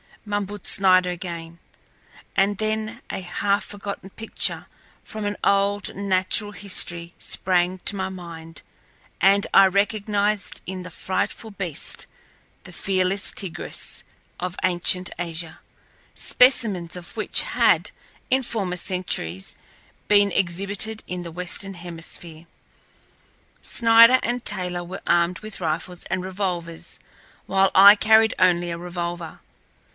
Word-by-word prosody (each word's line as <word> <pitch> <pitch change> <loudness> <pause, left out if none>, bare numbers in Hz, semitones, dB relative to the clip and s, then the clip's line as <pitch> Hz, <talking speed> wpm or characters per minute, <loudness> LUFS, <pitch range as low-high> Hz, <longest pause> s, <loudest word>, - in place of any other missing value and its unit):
mumbled 205 0 -4
Snider 185 -2 +4
again, 170 -2 -6 0.8
and 195 +1 +2
then 220 +1 -2
a - - -4
half 200 +3 0
forgotten 200 -1 -7
picture 225 +3 -2 0.4
from 215 -1 -6
an 205 0 -1
old 200 0 +1
natural 200 +2 +1
history 175 -4 -2
sprang 180 0 +1
to 205 - 0
my 190 -1 -2
mind, 165 -3 -10 0.6
and 200 +1 +4
I 195 - +8
recognized 205 +1 0
in 185 0 -4
the 180 - -8
frightful 190 +6 -2
beast 190 -6 -3 0.6
the - - -11
Felis 195 +1 0
tigris 175 -4 -6 0.4
of 180 0 -4
ancient 180 0 +2
Asia, 165 -1 -5 0.6
specimens 210 -10 +2
of 180 +3 -9
which 215 - +4
had, - - +2 0.4
in 260 +1 +3
former 200 -7 -3
centuries, 160 - -3 0.5
been 205 -1 +5
exhibited 200 +4 -1
in 180 -1 -4
the 170 - -7
Western 180 +3 -2
Hemisphere. 170 -1 -7 1.2
Snider 230 +2 +6
and 245 +1 -2
Taylor 180 -3 -1
were 175 +2 -8
armed 175 +1 +2
with 215 -2 -7
rifles 170 +2 -3
and 185 -1 -2
revolvers, 180 -3 -4 0.5
while 195 0 +3
I 200 +2 +10
carried 220 +1 +4
only 175 -1 +3
a 170 - -4
revolver. 175 -1 -5
185 Hz, 120 wpm, -23 LUFS, 175-205 Hz, 1.2 s, I